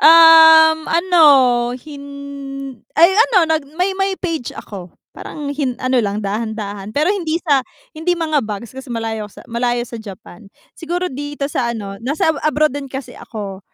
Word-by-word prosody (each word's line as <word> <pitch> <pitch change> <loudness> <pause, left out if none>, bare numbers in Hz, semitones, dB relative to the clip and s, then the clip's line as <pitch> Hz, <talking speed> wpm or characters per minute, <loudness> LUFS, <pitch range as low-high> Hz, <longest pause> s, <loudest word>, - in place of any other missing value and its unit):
Um, 320 -1 +8
ano 340 0 +3 0.5
hin 280 +1 -11 0.9
ay 335 +3 +6 0.2
ano 380 -8 +4
nag 315 -3 -1
may 370 +2 +1
may 390 0 -1
page 330 -10 -4
ako 190 -4 -9 0.2
parang 290 -2 -7
hin 275 -4 -2
ano 255 -1 +1
lang 205 -1 -3
dahan-dahan 205 -1 -4
pero 315 +7 +2
hindi 330 -5 -2
sa 285 -5 +3 0.3
hindi 345 +3 -1
mga 315 -3 0
bags 215 0 -6
kasi 265 +1 -10
malayo 225 -3 -4
sa - - -15
malayo 240 +1 -1
sa 235 -1 -9
Japan. 195 -1 -12 0.2
Siguro 350 0 -4
dito 290 +1 -5
sa 240 - -1
ano 195 -2 -7
nasa 290 +6 0
abroad 305 -1 +1
din 280 -1 -6
kasi 265 0 -7
ako. 200 -4 -8
280 Hz, 155 wpm, -18 LUFS, 225-320 Hz, 0.9 s, Um